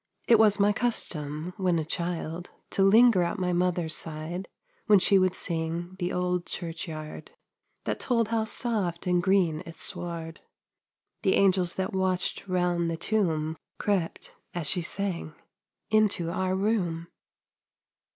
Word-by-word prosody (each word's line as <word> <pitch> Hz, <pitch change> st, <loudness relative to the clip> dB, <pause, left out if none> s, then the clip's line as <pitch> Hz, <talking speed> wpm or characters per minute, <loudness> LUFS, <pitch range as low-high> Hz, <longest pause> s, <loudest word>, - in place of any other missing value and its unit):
It 230 Hz, -2 st, +6 dB
was 210 Hz, -2 st, +5 dB
my 205 Hz, +1 st, +4 dB
custom, 165 Hz, -8 st, -2 dB
when 180 Hz, -3 st, +2 dB
a 160 Hz, -, -1 dB
child, 170 Hz, +1 st, -3 dB, 0.2 s
To 195 Hz, -, +2 dB
linger 220 Hz, 0 st, +6 dB
at 170 Hz, +3 st, -1 dB
my 180 Hz, -1 st, 0 dB
mother's 175 Hz, -2 st, +1 dB
side 160 Hz, +4 st, -5 dB, 0.4 s
When 210 Hz, -2 st, +7 dB
she 195 Hz, +1 st, +5 dB
would 185 Hz, -1 st, +2 dB
sing 170 Hz, +2 st, -3 dB
"The 175 Hz, 0 st, -1 dB
Old 180 Hz, -1 st, -1 dB
Church 165 Hz, -2 st, -5 dB
Yard," 155 Hz, -1 st, -7 dB, 0.5 s
That -, -, -2 dB
told 230 Hz, -3 st, +1 dB
how 225 Hz, -1 st, +1 dB
soft 205 Hz, -7 st, -2 dB
and 180 Hz, -1 st, +2 dB
green 175 Hz, -4 st, +2 dB
its 165 Hz, -2 st, -6 dB
sward. 165 Hz, -1 st, -5 dB, 0.8 s
"The 190 Hz, -, +3 dB
angels 185 Hz, -3 st, +3 dB
that 190 Hz, 0 st, -2 dB
watched 190 Hz, 0 st, 0 dB
'round 175 Hz, -2 st, +1 dB
the 165 Hz, -, -2 dB
tomb" 160 Hz, -5 st, 0 dB, 0.2 s
Crept, 195 Hz, -5 st, -1 dB, 0.2 s
as 170 Hz, -3 st, -2 dB
she 180 Hz, +4 st, +1 dB
sang, 170 Hz, -3 st, -3 dB, 0.6 s
into 210 Hz, -6 st, +2 dB
our 185 Hz, +1 st, 0 dB
room. 190 Hz, -5 st, 0 dB
180 Hz, 140 wpm, -28 LUFS, 165-195 Hz, 0.8 s, When